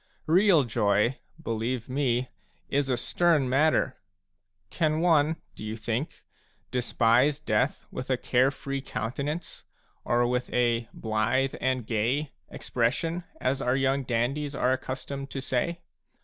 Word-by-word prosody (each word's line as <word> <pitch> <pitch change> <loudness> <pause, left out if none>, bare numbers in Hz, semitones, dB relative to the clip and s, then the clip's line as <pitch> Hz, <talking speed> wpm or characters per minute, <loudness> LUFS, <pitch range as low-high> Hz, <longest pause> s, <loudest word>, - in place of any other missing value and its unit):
Real 175 -1 +5
joy, 110 +1 +1 0.2
believe 115 -3 -2
me, 130 -2 0 0.4
is 140 -1 +1
a 125 - +1
stern 160 +1 +2
matter. 135 0 +2 0.7
Can 155 -2 +1
one, 160 -2 +3 0.2
do - - -10
you 110 +1 -4
think, 120 +6 -3 0.5
despise 125 +3 +3
death 130 -1 0
with 130 - -6
a 130 - +2
care 125 +2 +3
free 140 -1 -4
counten 135 +2 -3
ance, 160 +2 -7 0.4
or 120 0 +2
with 125 +1 -1
a 120 -1 +1
"blithe 110 +5 0
and 130 -2 0
gay" 125 +7 0 0.2
expression, 160 +9 -1
as 130 +1 0
our 125 -2 +1
young 135 +1 +2
dandies 135 +4 -1
are 125 - +2
accustomed 135 +1 -5
to 135 - -4
say 145 +6 -1
130 Hz, 135 wpm, -27 LUFS, 120-145 Hz, 0.7 s, Real